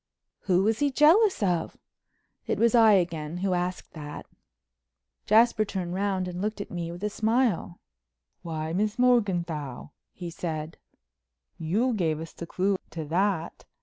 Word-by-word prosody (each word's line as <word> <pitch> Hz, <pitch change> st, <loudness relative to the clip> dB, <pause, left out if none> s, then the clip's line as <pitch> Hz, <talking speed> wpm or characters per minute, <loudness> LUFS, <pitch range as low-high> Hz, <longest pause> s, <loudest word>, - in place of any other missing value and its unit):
"Who 185 Hz, -1 st, +3 dB
was 220 Hz, +2 st, +1 dB
he 290 Hz, -, +2 dB
jealous 325 Hz, -, +4 dB
of?" 180 Hz, -4 st, -1 dB, 0.7 s
It -, -, 0 dB
was 235 Hz, +1 st, +3 dB
I 225 Hz, -3 st, +7 dB
again 165 Hz, -4 st, 0 dB
who 190 Hz, +1 st, 0 dB
asked 180 Hz, +1 st, -3 dB
that. 150 Hz, -2 st, -8 dB, 1.0 s
Jasper 220 Hz, 0 st, +5 dB
turned 185 Hz, -4 st, -4 dB
round 190 Hz, -1 st, -1 dB
and 180 Hz, 0 st, -5 dB
looked 215 Hz, +1 st, -2 dB
at 200 Hz, -, -6 dB
me 170 Hz, -1 st, -4 dB
with 175 Hz, +3 st, -9 dB
a 210 Hz, -, 0 dB
smile. 220 Hz, -5 st, 0 dB, 0.6 s
"Why, 160 Hz, -1 st, -4 dB
Miss 210 Hz, +3 st, 0 dB
Morganthau," 175 Hz, -, 0 dB, 0.2 s
he 175 Hz, -2 st, -7 dB
said, 160 Hz, -2 st, -5 dB, 0.8 s
"you 210 Hz, +11 st, +1 dB
gave 160 Hz, -7 st, 0 dB
us 165 Hz, 0 st, -8 dB
the 170 Hz, -, -8 dB
clue 190 Hz, +3 st, 0 dB
to 160 Hz, -2 st, -6 dB
that. 180 Hz, -1 st, -1 dB
185 Hz, 150 wpm, -27 LUFS, 165-215 Hz, 1.0 s, I